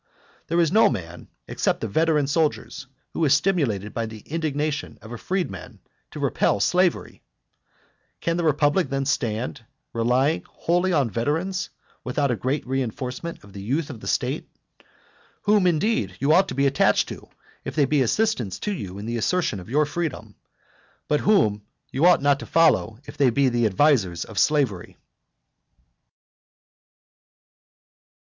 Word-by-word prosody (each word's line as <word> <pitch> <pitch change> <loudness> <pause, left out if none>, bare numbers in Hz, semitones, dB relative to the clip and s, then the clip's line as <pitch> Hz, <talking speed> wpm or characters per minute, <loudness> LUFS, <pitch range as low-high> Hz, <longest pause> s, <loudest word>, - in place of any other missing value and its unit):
There 170 +1 +1
is 165 -2 +3
no 220 +3 +5
man, 90 -7 -6 0.2
except - - -1
the - - -2
veteran 155 +5 +2
soldiers, 150 -2 -1 0.3
who 165 - -1
is 145 -2 +5
stimulated 140 - 0
by 115 -1 -2
the 110 -1 -10
indignation 155 0 -3
of 110 - -12
a 120 - -5
freeman 140 - -4 0.3
to - - -9
repel 100 - +1
slavery! 180 - +1 1.0
Can 165 - -1
the 175 - -1
republic 150 +3 +2
then 135 0 -1
stand, 120 -4 -2 0.3
relying 125 +7 +1
wholly 175 +2 0
on 140 -9 +1
veterans, 160 - -1 0.3
without 135 +2 0
a - - +1
great 130 +6 -2
reinforcement 130 +4 -4
of 100 -1 -16
the 100 - -8
youth 145 +9 -2
of 120 - -9
the - - -9
state? - - -1 0.9
Whom, 205 -3 +3
indeed, 160 - 0
you 140 +4 +3
ought 190 +3 +5
to - - -5
be 140 +1 +2
attached 135 0 +3
to, - - -9 0.3
if - - -6
they 145 -3 +4
be 145 +1 +2
assistants 125 - 0
to 210 - -2
you 95 - -6
in 100 - -7
the 120 +1 -2
assertion 165 - 0
of 90 - -11
your 150 +4 +2
freedom, 160 0 -4 0.7
but 150 - +2
whom 110 - +2 0.3
you 150 +7 +3
ought 180 -5 +4
not 140 -1 +3
to - - -8
follow 160 -9 +3
if 145 +1 -11
they 140 -3 +4
be 135 +3 +2
the 120 -2 +2
advisers 100 - +2
of 110 - -4
slavery. 135 - +1
140 Hz, 155 wpm, -24 LUFS, 115-165 Hz, 1.0 s, no